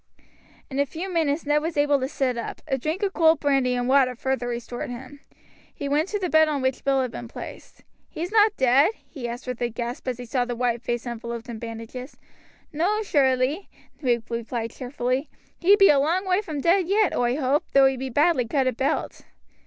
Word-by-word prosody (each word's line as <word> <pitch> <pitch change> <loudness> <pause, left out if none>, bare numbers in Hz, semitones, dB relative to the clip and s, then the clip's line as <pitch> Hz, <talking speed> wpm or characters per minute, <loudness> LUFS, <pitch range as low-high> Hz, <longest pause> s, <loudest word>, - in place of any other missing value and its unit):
In 270 - -2
a 280 - +3
few 360 +5 -6
minutes 315 -2 0
Ned 295 +1 +2
was 325 0 -3
able 290 -1 +3
to 260 - -1
sit 265 -3 -1
up; 235 - -6
a 265 - +1
drink 310 - -3
of 390 -1 0
cold 320 -2 +4
brandy 270 -3 +2
and 245 0 -1
water 260 -1 +4
further 265 0 -2
restored 240 0 -5
him. 255 +3 -9 0.5
He 285 - -5
went 295 +4 +1
to 420 - -1
the 380 -3 -2
bed 315 -1 +5
on 285 -3 -1
which 260 0 -1
Bill 270 -1 +2
had 250 - -4
been 240 - -7
placed. - - -10 0.3
"He's 345 +4 -5
not 425 -1 +4
dead?" 265 - +4
he 255 -6 -6
asked 240 +2 -7
with 250 -2 -5
a 240 - +1
gasp, 240 +3 -5
as 250 -2 -1
he 250 - -7
saw 245 +1 0
the 245 0 -4
white 240 -1 0
face 240 0 -3
enveloped 235 0 -6
in 230 -2 -6
bandages. 230 +3 -8 0.6
"No, 395 +8 +1
surelie," 275 +1 +1 0.3
Luke 240 -4 +1
replied 230 0 -3
cheerfully; 255 +2 -2 0.3
"he 385 +4 +6
be 395 -1 +6
a 285 - +5
long 340 +7 +1
way 370 +2 +2
from 310 -9 -5
dead 350 +2 +3
yet, 410 +1 +2
oi 245 0 +1
hoape, 280 +1 0
though 275 -1 +7
he 270 0 +3
be 260 +1 -4
badly 290 -1 +2
cut 270 +2 +1
about." 265 +3 -1
270 Hz, 210 wpm, -24 LUFS, 245-315 Hz, 0.6 s, though